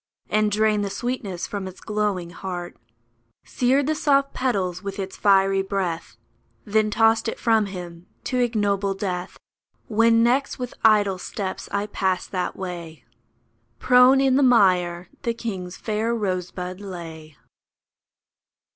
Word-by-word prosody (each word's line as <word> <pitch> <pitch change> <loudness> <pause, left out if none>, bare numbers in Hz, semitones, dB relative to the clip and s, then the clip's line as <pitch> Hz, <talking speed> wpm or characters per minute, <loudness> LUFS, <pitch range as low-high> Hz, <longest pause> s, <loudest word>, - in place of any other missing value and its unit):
And 215 0 +2
drained 215 0 +2
the 200 - -2
sweetness 215 -6 -4
from 200 -2 -5
its 185 - -10
glowing 205 -5 -2
heart; 175 -1 -6 0.7
Seared 260 +3 +1
the 310 - +1
soft 280 -2 +2
petals 190 -9 -1
with 200 0 -6
its 190 -1 -5
fiery 195 -1 +3
breath, 190 -4 -3 0.5
Then 215 0 +2
tossed 225 +1 +3
it - - -4
from 225 -3 +2
him 175 -2 -9 0.2
to 255 - -1
ignoble 205 -5 0
death! 185 -2 -4 0.5
When 230 +1 +4
next 260 +4 +1
with 250 -2 -5
idle 205 -4 +4
steps 190 0 -5
I 200 +1 -1
passed 190 -3 -2
that 180 -2 -2
way, 170 -4 -7 0.7
Prone 250 +2 +6
in 270 -1 +3
the - - +3
mire 180 -8 +3
the 235 -1 -1
king's 190 -6 -5
fair 220 +2 -1
rosebud 185 -3 -3
lay. 165 -6 -9
200 Hz, 135 wpm, -23 LUFS, 185-230 Hz, 0.7 s, Prone